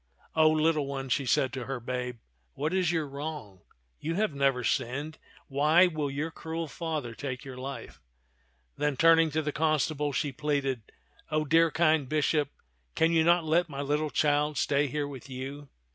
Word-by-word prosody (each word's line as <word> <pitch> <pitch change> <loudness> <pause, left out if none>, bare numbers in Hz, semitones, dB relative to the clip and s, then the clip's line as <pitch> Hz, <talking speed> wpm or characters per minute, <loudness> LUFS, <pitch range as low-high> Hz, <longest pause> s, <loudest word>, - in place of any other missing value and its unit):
O 155 -1 +6
little 155 -2 +2
one," 135 -1 -4
she 135 +1 0
said 130 0 +2
to 130 -2 -4
her 135 -2 -4
babe, 125 0 -4 0.4
"what 155 +5 -2
is 185 -3 +2
your 160 -3 -1
wrong? 140 - -7 0.4
You 165 +2 -3
have 210 -4 0
never 135 -3 +1
sinned; 140 +6 -2 0.3
why 150 +6 +5
will 155 -5 -1
your 150 +4 -3
cruel 165 0 -5
father 145 -3 -4
take 130 +2 -5
your 130 -2 -8
life? 135 +2 -7 0.4
" - - -41
Then 150 -2 0
turn 165 +2 +6
ing 165 -1 +3
to 155 +1 -1
the 150 - -1
constable, 150 -1 0
she 140 +2 -1
pleaded, 135 -4 -2 0.2
" - - -31
O 155 0 +1
dear 165 +3 +4
kind 155 -4 +2
bishop, 150 -1 +1 0.5
can 165 +1 +3
you 165 -1 +4
not 170 0 +4
let 170 +2 +2
my 140 -1 -5
little 150 +2 0
child 150 0 +1
stay 145 +1 +2
here 145 +2 -2
with 135 -1 -9
you 135 +2 -7
145 Hz, 185 wpm, -29 LUFS, 135-160 Hz, 0.5 s, O